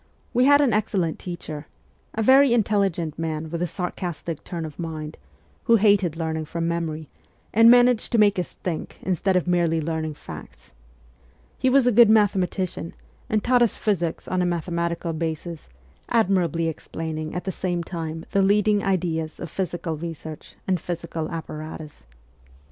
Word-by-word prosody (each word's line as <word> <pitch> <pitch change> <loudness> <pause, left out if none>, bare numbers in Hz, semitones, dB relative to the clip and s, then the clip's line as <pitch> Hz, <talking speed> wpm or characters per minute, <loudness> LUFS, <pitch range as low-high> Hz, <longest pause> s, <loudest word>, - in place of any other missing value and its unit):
We 250 +1 +4
had 285 +1 +6
an 265 -6 +3
excellent 195 -6 0
teacher 160 -4 -7 0.5
a 220 - 0
very 270 +4 +7
intelli 210 -4 +2
gent 160 -2 -5
man 160 -1 -3
with 170 0 -3
a 175 - +1
sarcastic 175 -3 -4
turn 170 -2 -5
of 155 +1 -9
mind, 155 -2 -5 0.5
who 230 - +6
hated 200 -6 +3
learning 160 -1 -2
from 165 +1 -3
memory, 160 -2 -2 0.5
and 230 +2 +7
managed 245 -1 +5
to - - +4
make 205 -3 +4
us 175 - -4
think 170 -4 -4
instead 190 +1 +1
of 180 - +2
merely 170 -2 +2
learning 160 -1 -3
facts. - - -11 0.9
He 260 - +3
was 265 -1 +5
a 245 - +4
good 230 0 +7
mathematician, 190 -5 +1 0.3
and 215 -1 +1
taught 245 0 +3
us 235 - +3
physics 175 -6 -1
on 185 0 0
a - - +2
mathe 175 0 -2
matical 170 -1 -1
basis, 165 0 -4 0.4
admirably 180 -7 +2
explaining 155 0 -5
at 180 - -3
the 190 - -2
same 175 -1 -2
time 165 -2 -5
the 200 - +3
leading 205 +1 +3
ideas 165 -5 -1
of 170 - -6
physical 175 -3 -3
research 160 -1 -8
and 185 -2 +1
physical 170 -2 -4
apparatus. 155 - -7
175 Hz, 160 wpm, -24 LUFS, 160-205 Hz, 0.9 s, very